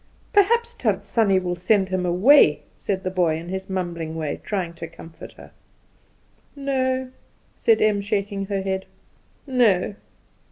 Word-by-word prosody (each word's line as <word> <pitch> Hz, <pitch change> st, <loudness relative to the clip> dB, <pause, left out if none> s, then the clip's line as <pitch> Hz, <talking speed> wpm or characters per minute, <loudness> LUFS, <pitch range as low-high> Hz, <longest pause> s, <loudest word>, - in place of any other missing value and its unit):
"Perhaps 470 Hz, +4 st, +3 dB
Tant -, -, -1 dB
Sannie 205 Hz, -5 st, +2 dB
will 180 Hz, -1 st, -1 dB
send 190 Hz, +2 st, +1 dB
him 185 Hz, -1 st, -1 dB
away," 180 Hz, -, +5 dB
said 190 Hz, -2 st, -3 dB
the 185 Hz, -, -2 dB
boy, 175 Hz, -4 st, +1 dB
in 170 Hz, +2 st, -8 dB
his 190 Hz, +1 st, -5 dB
mumbling 170 Hz, -4 st, -3 dB
way, 155 Hz, -3 st, -4 dB
trying 185 Hz, -5 st, -3 dB
to 165 Hz, 0 st, -7 dB
comfort 165 Hz, 0 st, -12 dB
her. -, -, -15 dB, 1.0 s
"No," 260 Hz, -2 st, -1 dB, 0.4 s
said 455 Hz, -2 st, +3 dB
Em, 210 Hz, -2 st, +2 dB
shaking 200 Hz, -1 st, -2 dB
her 195 Hz, -1 st, -2 dB
head; 190 Hz, 0 st, -3 dB, 0.6 s
"no. 225 Hz, -8 st, +2 dB
190 Hz, 145 wpm, -23 LUFS, 180-240 Hz, 1.0 s, away